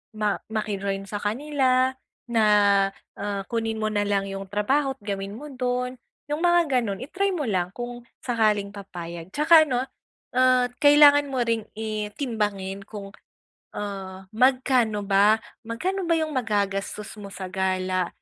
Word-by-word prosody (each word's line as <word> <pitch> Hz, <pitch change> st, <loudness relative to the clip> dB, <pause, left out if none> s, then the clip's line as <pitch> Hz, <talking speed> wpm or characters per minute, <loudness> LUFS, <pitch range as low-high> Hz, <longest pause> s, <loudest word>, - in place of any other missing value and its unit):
ma 210 Hz, -1 st, 0 dB
maki-join 200 Hz, -2 st, -2 dB
sa 205 Hz, -, -3 dB
kanila 260 Hz, +3 st, +1 dB, 0.3 s
na, 230 Hz, -2 st, +2 dB, 0.7 s
ah, 200 Hz, 0 st, -3 dB
kunin 225 Hz, -2 st, -2 dB
mo 215 Hz, -, +1 dB
na 205 Hz, -1 st, 0 dB
lang 200 Hz, -1 st, 0 dB
yung 195 Hz, 0 st, -5 dB
trabaho 265 Hz, +8 st, 0 dB
at 265 Hz, -, -33 dB
gawin 200 Hz, -1 st, -4 dB
mo 295 Hz, +8 st, -8 dB
do'n, 250 Hz, -1 st, -2 dB, 0.3 s
yung 295 Hz, +2 st, -2 dB
mga 345 Hz, -2 st, +4 dB
gano'n. 200 Hz, -2 st, -4 dB
I-try 380 Hz, +8 st, -1 dB
mo 310 Hz, -5 st, -2 dB
lang 180 Hz, -2 st, -1 dB
kung 240 Hz, +1 st, -7 dB, 0.2 s
sakaling 215 Hz, -4 st, +1 dB
papayag. 175 Hz, -2 st, -8 dB
Tsaka 315 Hz, +1 st, +6 dB
ano, 250 Hz, -4 st, 0 dB, 0.5 s
ah, 255 Hz, -1 st, +4 dB
kailangan 290 Hz, 0 st, +7 dB
mo 260 Hz, -2 st, 0 dB
ring 230 Hz, -2 st, 0 dB
i 215 Hz, -1 st, -4 dB
timbangin 205 Hz, -6 st, -3 dB
kung, 200 Hz, -2 st, -8 dB, 0.7 s
ah, 195 Hz, -2 st, -6 dB
magkano 250 Hz, -3 st, +2 dB
ba, 200 Hz, +2 st, +5 dB, 0.3 s
magkano 365 Hz, +12 st, -2 dB
ba 335 Hz, -, +4 dB
yung 315 Hz, -1 st, -1 dB
magagastos 210 Hz, -4 st, -2 dB
mo 200 Hz, -, -8 dB
sa 195 Hz, -1 st, -7 dB
gala 185 Hz, -1 st, 0 dB
220 Hz, 145 wpm, -25 LUFS, 200-255 Hz, 0.7 s, kailangan